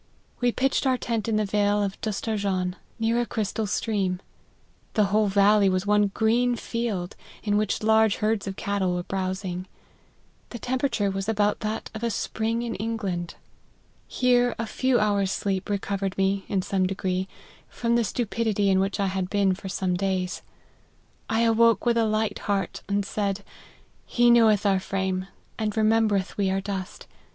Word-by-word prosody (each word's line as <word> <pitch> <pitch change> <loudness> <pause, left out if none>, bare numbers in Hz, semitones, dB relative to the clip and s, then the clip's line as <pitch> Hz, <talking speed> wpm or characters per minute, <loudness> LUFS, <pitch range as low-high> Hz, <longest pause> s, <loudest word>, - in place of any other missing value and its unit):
We 245 -1 +2
pitched 270 +2 +1
our 260 -1 +3
tent 230 -3 -2
in 220 - +1
the 215 0 +2
vale 205 0 +2
of 195 -1 -4
Dustarjan, 200 -4 -1 0.2
near 230 +1 +1
a - - -1
crystal 215 0 -2
stream; 195 -3 -1 0.8
the 215 - +4
whole 215 0 +4
valley 200 0 +4
was 185 +1 0
one 210 0 +3
green 235 +4 +2
field, 225 -6 -3 0.3
in 205 -1 +1
which 210 0 0
large 220 -1 +4
herds 215 -1 -1
of 195 - -4
cattle 190 -3 -1
were 175 - -2
browsing. 185 -1 -3 0.8
The 240 - -6
temperature 245 -4 0
was 195 +2 -3
about 210 -1 +1
that 215 +1 -4
of 230 +1 -2
spring 225 +3 -2
in 235 -1 -3
England. 200 -6 -3 0.7
Here 245 -1 +2
a 230 - -2
few 255 +2 +1
hours 200 -2 +1
sleep 195 -1 -2
recovered 195 -1 -2
me, 195 0 +1
in 190 -2 0
some 185 -1 +1
degree, 185 0 -2 0.4
from 235 -1 -1
the 235 - +3
stupidity 220 -3 0
in 190 - +3
which 195 +2 -1
I 200 - +2
had 190 -1 -2
been 200 -2 +2
for 190 +1 -7
some 185 -1 -1
days. 185 -1 -1 0.9
I 225 +1 +2
awoke 230 -2 +4
with 240 -1 +3
a 230 - +3
light 215 0 0
heart, 195 -3 -1
and 200 0 0
said, 200 0 -2 0.3
' - - -33
He 240 0 +4
knoweth 220 -3 +5
our 195 -2 +3
frame, 190 -1 -2 0.3
and 215 -1 -2
remembereth 215 -3 +2
we 200 -2 +1
are 190 +1 +1
dust. 195 -1 -5
205 Hz, 165 wpm, -25 LUFS, 195-225 Hz, 0.9 s, knoweth